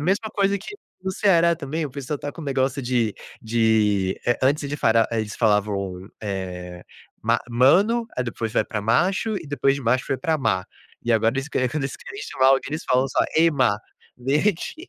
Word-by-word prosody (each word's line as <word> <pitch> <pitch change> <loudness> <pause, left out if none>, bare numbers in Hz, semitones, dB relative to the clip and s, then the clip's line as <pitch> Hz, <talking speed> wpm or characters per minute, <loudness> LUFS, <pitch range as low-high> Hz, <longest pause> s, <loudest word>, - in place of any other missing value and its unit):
mesma 195 +8 0
coisa 200 -1 +1
que 215 - -9 0.3
no 190 - -2
Ceará 170 -4 +4
também, 155 0 -3
o - - -10
pessoal 140 +2 -4
está 145 0 -6
com - - -10
o - - -7
negócio 135 0 0
de 120 -4 0 0.3
de, 110 -4 +2
eh, 120 - +3
antes 140 +3 +3
de 145 - -3
eles 145 +1 -5
fara 115 0 +4
eh, 115 - +1
eles 105 -1 -5
falavam, 100 -4 0
eh, 90 -3 -5 0.4
"ma 115 +2 +2
mano", 180 - +4
aí 125 - 0
depois 115 -1 -4
vai - - +2
para 105 - -4
"macho" 185 - +1
e 170 -5 -7
depois 140 -1 +1
de - - -6
"macho" 125 +2 +1
foi 135 - -1
para 160 +5 0
"má", 95 -10 0 0.4
e 120 - 0
agora 115 0 +3
eles 135 +2 -3
que 145 - -1
quando 145 +2 -3
eles 135 - -4
querem 405 - -9
chamar 130 - +1
alguém, 135 0 +5
eles 155 - -3
falam 130 +1 +2
só: - - 0 0.2
"Ei, 165 0 +5
má", 125 -7 +2 0.5
gente, 160 +7 +1
130 Hz, 210 wpm, -23 LUFS, 110-155 Hz, 0.5 s, alguém